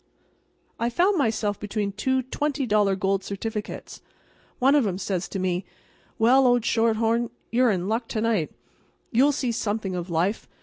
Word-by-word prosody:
I 235 - +1
found 355 +9 +2
myself 220 -5 0
between 210 -1 -2
two 260 +6 0
$20 245 -8 0
gold 195 0 0
certificates. 210 +2 -5 0.6
One 270 +2 +4
of 285 -7 +4
'em 185 -2 -2
says 190 -2 -2
to - - -4
me: 185 0 -1 0.5
"Well, 255 +4 +5
old 245 -2 +3
shorthorn, 230 +1 +2 0.2
you're 245 +1 +4
in 185 -3 0
luck 225 +2 -1
to 220 - -2
night. 215 -9 0 0.6
You'll 265 +5 +4
see 260 -3 -1
something 210 -3 -2
of 175 0 -4
life. 175 +6 0
220 Hz, 155 wpm, -25 LUFS, 195-245 Hz, 0.6 s, Well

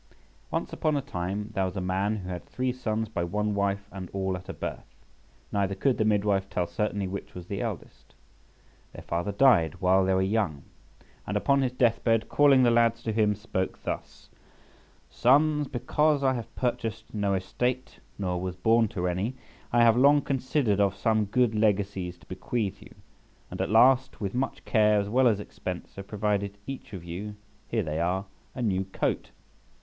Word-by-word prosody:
ONCE - - -2
upon 155 -2 0
a - - 0
time 100 -3 -4
there 95 -2 +1
was 95 +1 -4
a - - 0
man 95 +3 0
who 95 -3 -6
had 90 -2 -5
three 125 0 -2
sons 110 -3 -2
by 95 -5 -3
one 105 +4 -1
wife 100 0 -1
and 95 -2 -7
all 95 -1 -1
at 90 0 -9
a - - -3
birth, - - -7 0.6
neither 100 -1 0
could 130 +6 +1
the - - +4
midwife 100 -2 +1
tell 90 - -1
certainly 100 +3 -2
which 100 +2 -7
was 90 -1 -7
the 100 +2 -4
eldest. - - -7 0.8
Their - - -10
father 85 +4 -2
died 100 - +4
while 95 +1 +4
they 95 0 +2
were 95 - +2
young, 95 -8 0 0.6
and - - 0
upon 140 0 +2
his 130 -2 +1
death 120 -2 +1
bed, 115 -1 +2
calling 140 -3 +5
the 120 - +5
lads 115 0 +3
to 110 - -2
him, 105 -1 +2
spoke 95 -3 -4
thus:— - - -6 0.8
"Sons, 150 +3 +3
because 150 +4 +1
I 130 -1 +3
have 115 -2 -6
purchased 115 -3 -3
no 100 -2 0
estate, 125 +7 -2 0.2
nor 90 -3 -2
was 90 -1 -3
born 110 +5 +3
to 90 -3 -3
any, 95 +8 -2 0.4
I 120 0 +5
have 115 -1 +6
long 140 +3 +5
considered 130 -6 0
of 100 -1 +2
some 110 0 +1
good 120 +2 +2
legacies 100 -4 0
to - - -21
bequeath 100 +1 -3
you, - - -15 0.6
and - - -4
at - - -1
last, 125 +4 +4
with 100 -2 -3
much 130 +2 -3
care 105 -2 +4
as 100 0 -2
well 130 +3 +4
as 105 -4 +2
expense, 90 -3 -7
have 100 0 -7
provided 100 -1 -1
each 135 -3 -7
of 90 -3 -7
you 95 +5 -6 0.3
(here 115 -2 0
they 80 -1 -3
are) 90 +3 0 0.3
a 125 - -3
new 95 -3 0
coat. 95 - -2
105 Hz, 185 wpm, -27 LUFS, 95-120 Hz, 0.8 s, have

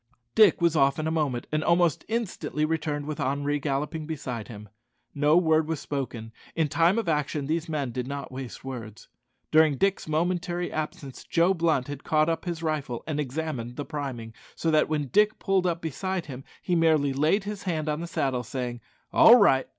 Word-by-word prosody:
Dick 210 -6 +5
was 170 -1 +3
off 140 -2 +3
in 155 - -2
a 160 - 0
moment, 145 -7 -1
and 155 0 0
almost 170 -3 +2
instantly 215 -8 -2
returned 155 -2 -2
with 155 0 -5
Henri 145 +2 0
galloping 150 +2 -2
beside 125 -8 -5
him. 105 -2 -10 0.5
No 150 +3 +3
word 160 -3 +3
was 160 -2 -2
spoken. 120 -7 -5 0.2
In 160 -3 +1
time 170 +7 +3
of 230 - -1
action 150 -2 -1
these 160 +2 -2
men 145 -5 -2
did 125 +1 -4
not 140 -1 -5
waste 130 0 -8
words. 115 -5 -8 0.4
During 155 -3 +5
Dick's 195 0 0
momentary 175 +2 -1
absence, 150 -3 -5
Joe 170 +3 +2
Blunt 160 -7 +1
had 145 -1 -7
caught 155 0 +2
up 165 - -2
his 170 -2 -4
rifle 145 -7 -2
and 150 -2 -3
examined 135 -4 -3
the 145 - -5
priming, 130 -6 -5 0.2
so 165 - 0
that 155 -1 +3
when 150 -3 -1
Dick 210 - +3
pulled 190 -2 +1
up 170 -1 -1
beside 185 +3 -3
him 135 -2 -9 0.2
he 180 - 0
merely 155 -4 +3
laid 155 +9 +2
his 205 0 -5
hand 155 -2 -2
on 150 0 -1
the 170 - -4
saddle, 135 -6 -1
saying, 120 0 -5 0.3
"All 235 - +9
right!" 135 - +4
155 Hz, 190 wpm, -26 LUFS, 135-165 Hz, 0.5 s, All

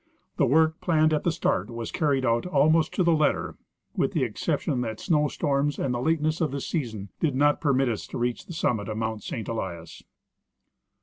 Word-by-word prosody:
The - - +3
work 160 +4 +3
planned 155 -2 +3
at 150 - 0
the 170 - +2
start 115 - 0
was 115 -1 -5
carried 140 -4 +1
out 115 +5 +1
almost 160 -2 +3
to 185 - +2
the 170 -1 +4
letter, 155 -2 0 0.4
with - - 0
the - - +1
exception 125 - -1
that 110 -3 -4
snow 150 -4 +2
storms 140 0 0
and 130 - -1
the 120 - -2
lateness 155 +2 0
of 160 - +2
the 140 - -4
season 115 - -4
did 150 -5 0
not 145 +2 +3
permit 135 -3 +2
us 115 -3 -3
to - - -6
reach 120 0 -2
the 175 - -7
summit 110 -9 -1
of 110 - -3
Mount 110 -1 -2
St. 110 - -5
Elias. 85 -7 -5
140 Hz, 200 wpm, -26 LUFS, 115-155 Hz, 0.4 s, the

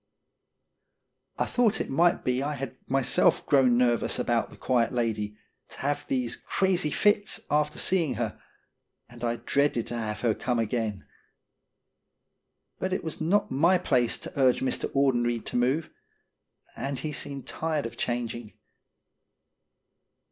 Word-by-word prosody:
I - - +1
thought 225 -3 +2
it - - -3
might 170 +6 +3
be 125 +1 0
I 145 +2 -2
had 135 -2 -6
myself 135 -1 +3
grown 130 -4 +4
nervous 120 -2 +2
about 120 -1 0
the - - -15
quiet 120 -2 +1
lady, 110 -4 -2 0.3
to - - -11
have 145 +1 -2
these 125 -3 0
crazy 185 -5 +1
fits 205 +5 +2
after 150 0 +1
seeing 165 -9 +2
her, 110 -1 -4 0.7
and 120 0 -13
I 120 0 0
dreaded 140 -2 +1
to 120 - -5
have 110 -2 -3
her 115 -3 +2
come 125 +3 -2
again. 110 -3 -2 1.7
But 185 0 -1
it - - -2
was 160 -1 -5
not 195 +6 +1
my 165 +8 +4
place 125 -9 +1
to - - -8
urge 130 -2 +4
Mr. 130 - -1
Audenried 120 -4 +1
to - - -5
move, 130 +6 +1 0.8
and 135 0 -3
he 155 +3 -4
seemed 140 -2 -3
tired 155 -4 -2
of 115 - -6
changing. 120 -2 -3
130 Hz, 140 wpm, -27 LUFS, 120-150 Hz, 1.7 s, grown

